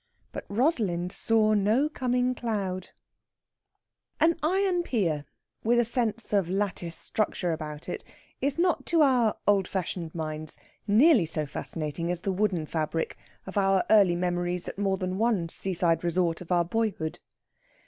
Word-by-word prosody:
BUT - - -7
ROSALIND 200 - +1
SAW 215 0 +2
NO 215 +8 +3
COMING 250 -3 0
CLOUD 200 -7 -3 1.3
An 330 +1 +4
iron 365 +2 +2
pier, 175 - -1 0.4
with 235 +2 +3
a 240 - +3
sense 230 -2 -1
of 195 -4 +2
lattice 185 -3 -2
structure 195 -4 -1
about 155 -1 -6
it, - - -5 0.4
is 280 +2 0
not 350 0 +1
to 330 -2 +4
our 245 -6 +3
old 200 -2 +3
fashioned 175 -3 -4
minds 155 -1 -5 0.3
nearly 225 - +5
so 155 -1 -1
fascinating 155 +3 -4
as 175 -1 0
the 195 - -1
wooden 185 -4 0
fabric 160 +1 -2 0.3
of 195 +1 -2
our 195 -1 +3
early 200 -5 +6
memories 175 0 -1
at - - -6
more 195 -1 +1
than 185 +1 -3
one 215 -7 +1
seaside 170 -2 0
resort 170 -1 0
of 180 - -9
our 175 -1 +3
boyhood. 180 -5 -2
195 Hz, 150 wpm, -27 LUFS, 170-230 Hz, 1.3 s, early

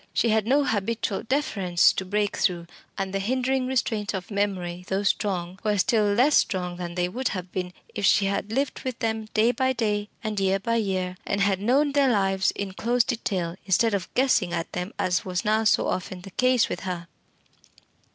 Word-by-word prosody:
She 235 - +2
had 220 -1 +2
no 280 +3 +4
habitual 220 -3 -1
deference 200 - +2
to 190 - -3
break 205 +1 0
through, 175 -2 0 0.3
and 195 0 -3
the 195 - 0
hindering 255 +4 0
restraints 220 -5 -1
of 185 +2 -6
memory, 185 -3 -2
though 195 +1 -1
strong, 190 -2 -1
were 210 -1 +1
still 215 +2 +3
less 255 +8 +4
strong 180 -2 +1
than 175 -1 -5
they 180 -1 +1
would 250 +8 -2
have 185 -2 -4
been 180 -1 -3 0.2
if - - -4
she 200 0 +4
had 200 +2 -2
lived 270 +4 -1
with 255 -3 -4
them 220 -1 -2
day 225 +3 +4
by 260 0 +1
day 210 -3 -1
and 215 -2 -2
year 195 0 +2
by 230 +4 -1
year, 185 -4 -1
and 200 - -1
had 200 -1 +2
known 275 +7 +3
their 280 -1 +3
lives 195 -4 +2
in 200 -1 -4
close 240 +4 +2
detail 190 -7 -2
instead 215 +4 +3
of 190 -3 -2
guessing 215 -9 +2
at 165 -1 -3
them, 180 +3 -4
as 180 -1 0
was 180 -2 -3
now 215 +1 +2
so 220 - +3
often 185 0 -3
the 195 +1 -11
case 255 +2 +3
with - - -4
her. 180 -2 -5
205 Hz, 200 wpm, -25 LUFS, 185-230 Hz, 0.3 s, no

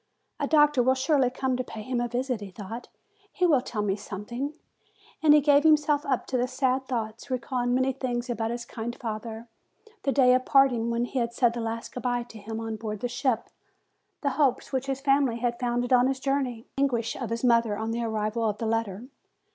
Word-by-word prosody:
"A - - 0
doctor 295 -4 +5
will 260 +2 +3
surely 270 -1 +2
come 260 0 -1
to 255 - -1
pay 220 -3 -8
him 250 +1 -1
a 240 - 0
visit," 245 -1 -2
he 200 - -7
thought; 215 +5 -8 0.4
"he 365 - +1
will 295 -7 +4
tell 215 -4 -3
me 195 -2 +1
something." 235 +8 -5 0.7
And 310 -1 +5
he 300 - +6
gave 285 0 +5
himself 300 -1 +3
up 265 -3 0
to 250 -1 0
sad 260 0 0
thoughts, 230 0 -4
recalling 245 -1 -1
many 260 +1 +2
things 245 -2 -3
about 225 -2 -2
his 235 0 -4
kind 235 +1 -5
father, 225 0 -6 0.5
the 275 - 0
day 255 -2 +5
of 255 0 +3
part 270 0 +5
ing, 230 -1 -1
when 235 +1 0
he 260 - -3
had 235 -1 -1
said 240 -2 +3
the 240 - -4
last 230 0 -4
good 250 - -5
bye 245 0 0
to 230 -2 -12
him 220 +2 -6
on 225 -1 -4
board 210 -1 -5
the 245 - 0
ship, 245 0 -1 0.7
the 280 - +1
hopes 270 -1 +1
which 260 0 -1
his 270 0 -2
family 275 -4 +2
had 235 0 -1
founded 245 0 0
on 250 0 +5
his 265 0 -1
journey, 265 -4 -1
the - - +1
anguish 235 -5 0
of 245 -4 -4
his 230 +2 -3
mother 230 -4 +3
on 220 +1 -2
the 235 +1 -2
arrival 220 0 -1
of 210 - -3
the 230 - -3
letter. 225 -2 -1
245 Hz, 220 wpm, -27 LUFS, 225-265 Hz, 0.7 s, he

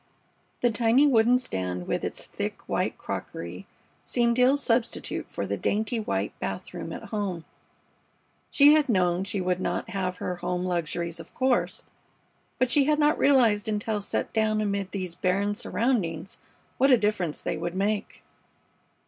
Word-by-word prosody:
The 245 - +3
tiny 235 +5 +4
wooden 245 -2 +5
stand 90 - -3
with - - -2
its - - -4
thick, - - -5
white - - -1
crockery 85 +3 -6 0.4
seemed 235 0 +1
ill 260 +3 +5
substitute 240 -4 -1
for 100 - -4
the 100 +1 -2
dainty 220 - 0
white 215 - -2
bath - - -5
room - - -6
at - - -8
home. 195 -6 -3 1.0
She 290 +1 +7
had 300 -3 +3
known 180 -3 +2
she 200 -1 -2
would 180 0 0
not - - -2
have 185 -2 -2
her 180 0 -3
home 180 +1 -2
luxuries, 170 -1 -2
of 165 - -12
course, 260 -2 0 0.7
but 255 -1 +1
she 280 0 +4
had 300 +1 +3
not 300 0 +3
realized 230 -6 +4
until 210 0 -1
set - - -2
down 220 -1 +2
amid 200 -2 -1
these 185 -4 -4
barren 195 +4 0
surroundings 200 -7 -1 0.4
what 270 - +5
a 255 - +7
difference 205 -7 -1
they - - -2
would 170 +2 -4
make. 205 +2 -2
205 Hz, 155 wpm, -27 LUFS, 180-240 Hz, 1.0 s, She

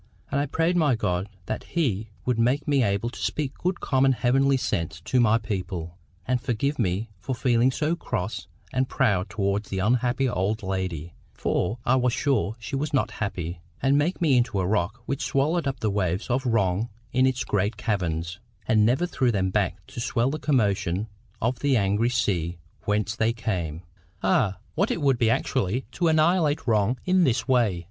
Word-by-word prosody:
And 140 - +1
I 145 - 0
prayed 165 +5 +1
my 150 -7 +3
God 90 -3 -1 0.2
that - - -4
He 110 - -1 0.2
would 125 -2 +1
make 125 +5 +2
me 140 -2 +3
able 100 +2 0
to - - -10
speak 145 -3 -2
good 180 +1 -1
common 135 -1 +3
heavenly 135 +3 +3
sense 85 -9 -2
to 125 +8 +1
my 115 -2 +5
people, 90 -6 -4 0.3
and 125 0 +1
forgive 135 +3 -1
me 105 +1 -1
for 130 +6 -3
feeling 120 0 +3
so 155 +5 0
cross 95 - -4 0.3
and 130 0 +1
proud 100 -7 +1
towards 100 0 -1
the 95 - -3
unhappy 125 +6 +1
old 105 -1 -1
lady—for 95 +2 -3
I 130 +2 +4
was 125 -2 +2
sure 120 -6 +1
she 115 +2 -5
was 145 +2 -1
not 130 - +1
happy—and 90 - -2
make 150 +6 +1
me 150 -7 +4
into 120 -5 +1
a 95 - 0
rock 100 +4 -1
which 140 +2 -3
swallowed 150 +4 +1
up 135 -2 -3
the 110 - +1
waves 95 +2 -1
of 130 +1 0
wrong 105 -1 +1 0.2
in 130 +1 +4
its 125 -1 0
great 105 +2 0
caverns, 85 -5 -2 0.3
and 110 -3 +4
never 125 +10 +3
threw 130 -8 +1
them 95 -3 0
back 95 -2 -1
to - - -9
swell 120 +1 +1
the 155 - -3
commotion 105 - +1 0.3
of 120 +2 -1
the 140 -1 +2
angry 105 +3 +2
sea 90 -8 0 0.3
whence 105 0 0
they 115 +1 +1
came. 90 -8 -3 0.4
Ah, 95 0 +2 0.2
what - - +1
it - - -1
would 135 -5 +2
be 115 - +3
actually 125 -1 0
to 170 +4 0
annihilate 160 -1 +3
wrong 110 +1 +2
in 185 0 +4
this 130 -6 +1
way! 120 -9 +2
115 Hz, 185 wpm, -25 LUFS, 100-135 Hz, 0.4 s, my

